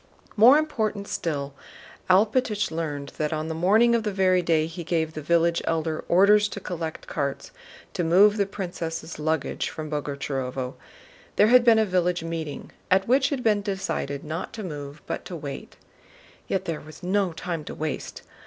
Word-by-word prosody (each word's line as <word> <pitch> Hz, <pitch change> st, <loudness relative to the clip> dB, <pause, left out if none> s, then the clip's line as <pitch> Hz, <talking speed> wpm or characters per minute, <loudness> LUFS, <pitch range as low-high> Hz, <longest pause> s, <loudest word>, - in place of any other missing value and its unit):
More 240 Hz, +7 st, +8 dB
important 220 Hz, -10 st, -1 dB
still, 145 Hz, -7 st, -3 dB, 0.6 s
Alpátych 210 Hz, +1 st, +2 dB
learned 150 Hz, -4 st, -4 dB
that 150 Hz, -1 st, 0 dB
on 155 Hz, 0 st, -2 dB
the -, -, -2 dB
morning 210 Hz, +8 st, +4 dB
of 235 Hz, -, +3 dB
the 215 Hz, -1 st, -2 dB
very 185 Hz, -2 st, +3 dB
day 165 Hz, -2 st, +2 dB
he 165 Hz, +2 st, -7 dB
gave 160 Hz, -1 st, -1 dB
the 155 Hz, -, -5 dB
village 170 Hz, +2 st, +2 dB
Elder 160 Hz, -1 st, -1 dB
orders 205 Hz, +4 st, +5 dB
to 205 Hz, -, -7 dB
collect 165 Hz, -4 st, -5 dB
carts 140 Hz, -3 st, -3 dB, 0.4 s
to 175 Hz, -, -1 dB
move 200 Hz, +6 st, +5 dB
the 200 Hz, -2 st, +1 dB
princess' 170 Hz, -5 st, -5 dB
luggage 155 Hz, -1 st, -1 dB
from 155 Hz, -1 st, -7 dB
Boguchárovo, 135 Hz, -3 st, -3 dB, 0.6 s
there 210 Hz, -, +5 dB
had 250 Hz, 0 st, +7 dB
been 230 Hz, -2 st, +6 dB
a 220 Hz, -, +4 dB
village 180 Hz, -3 st, 0 dB
meeting 165 Hz, -3 st, -5 dB, 0.2 s
at 190 Hz, +1 st, +3 dB
which 265 Hz, +3 st, +4 dB
it -, -, +2 dB
had 250 Hz, -, -7 dB
been 210 Hz, -2 st, +3 dB
decided 190 Hz, -8 st, -3 dB
not 155 Hz, +3 st, -5 dB
to 220 Hz, -, -6 dB
move 145 Hz, -4 st, -7 dB
but -, -, -4 dB
to 180 Hz, -, -6 dB
wait. 145 Hz, -4 st, -7 dB, 0.7 s
Yet 190 Hz, 0 st, -1 dB
there 165 Hz, -3 st, -3 dB
was 155 Hz, +4 st, -13 dB
no 190 Hz, 0 st, +1 dB
time 165 Hz, -1 st, -4 dB
to -, -, -7 dB
waste. 155 Hz, 0 st, -5 dB
170 Hz, 175 wpm, -25 LUFS, 155-205 Hz, 0.7 s, More